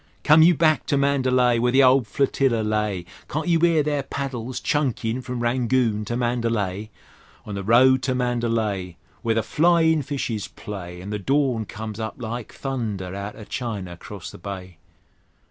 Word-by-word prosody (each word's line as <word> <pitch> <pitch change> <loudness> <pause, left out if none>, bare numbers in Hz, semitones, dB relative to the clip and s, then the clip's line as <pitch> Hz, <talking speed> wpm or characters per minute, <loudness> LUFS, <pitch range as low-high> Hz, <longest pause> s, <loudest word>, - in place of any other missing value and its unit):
Come 155 +2 +6
you 170 +2 +6
back 155 0 +2
to 140 - +2
Mandalay, 130 -3 +2
Where 125 +1 +2
the 135 +2 +5
old 130 -2 +5
Flotilla 135 -2 +1
lay: 105 -4 -1 0.2
Can't 155 +4 -3
you 170 -1 +2
'ear 165 -3 +4
their 145 -1 0
paddles 130 -3 -4
chunkin' 130 -4 -1
from 125 -1 -5
Rangoon 120 -3 +1
to 120 +3 -2
Mandalay? 115 -5 -1 0.6
On 105 - -6
the 100 - -3
road 125 +5 +5
to 130 -1 -1
Mandalay, 115 -7 -1 0.2
Where 115 -1 0
the 115 - +1
flyin' 160 +3 +3
fishes 130 -6 -3
play, 90 -4 -8
An' 100 - -6
the 105 - -2
dawn 130 0 +1
comes 110 +1 -7
up 110 0 -4
like 120 -1 -5
thunder 110 -9 -4
outer 100 +2 -6
China 105 -8 -4
'crost 95 +1 -9
the - - -12
Bay! 95 -2 -8
120 Hz, 165 wpm, -23 LUFS, 105-135 Hz, 0.6 s, Come